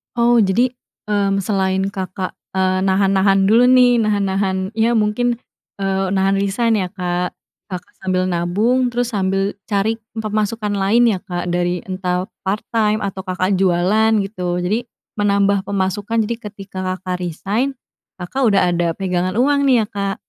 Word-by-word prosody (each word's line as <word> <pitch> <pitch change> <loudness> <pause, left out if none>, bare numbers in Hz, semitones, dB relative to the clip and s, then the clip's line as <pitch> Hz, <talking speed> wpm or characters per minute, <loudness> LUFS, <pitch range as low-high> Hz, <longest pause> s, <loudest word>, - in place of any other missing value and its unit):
Oh, 240 0 +4
jadi, 225 +5 +2 0.4
mmm, 195 -1 +1
selain 190 -1 0
Kakak, 185 -1 -4 0.2
eee, 185 0 +2
nahan-nahan 195 0 +3
dulu, 230 +5 +5
nih, 250 -2 +5
nahan-nahan, 195 -2 0
ya, 225 +1 +1
mungkin, 230 +3 +1 0.4
eee, 195 -1 -1
nahan 195 +1 +1
resign, 215 +2 +1
ya, 185 - -1
Kak, 180 -2 -3 0.3
Kakak 180 -2 -7
sambil 185 -1 0
nabung 210 +9 +1
terus 245 0 0
sambil 195 0 -1
cari 215 +2 0 0.2
pemasukan 215 0 -2
lain, 205 +4 +3
ya, 190 - -2
Kak, 175 -2 -4
dari 175 0 -1
entah 185 +1 -3 0.2
part 205 +3 -1
time 215 -2 +1
atau 195 0 -5
Kakak 185 +1 0
jualan, 195 +5 +3
gitu, 180 -3 -3
jadi 220 +7 -1 0.3
menambah 200 -1 +2
pemasukan. 205 +3 0
Jadi 230 +2 -2
ketika 200 -3 -9 0.2
Kakak 180 -1 -4
resign, 200 - -2 0.4
Kakak 230 +8 -1
udah 200 -3 +4
ada 170 -1 0
pegangan 185 0 -1
uang, 280 +3 +2
nih, 245 -4 +4
ya, 210 - -6
Kak. 200 -1 -2
195 Hz, 150 wpm, -19 LUFS, 185-220 Hz, 0.4 s, dulu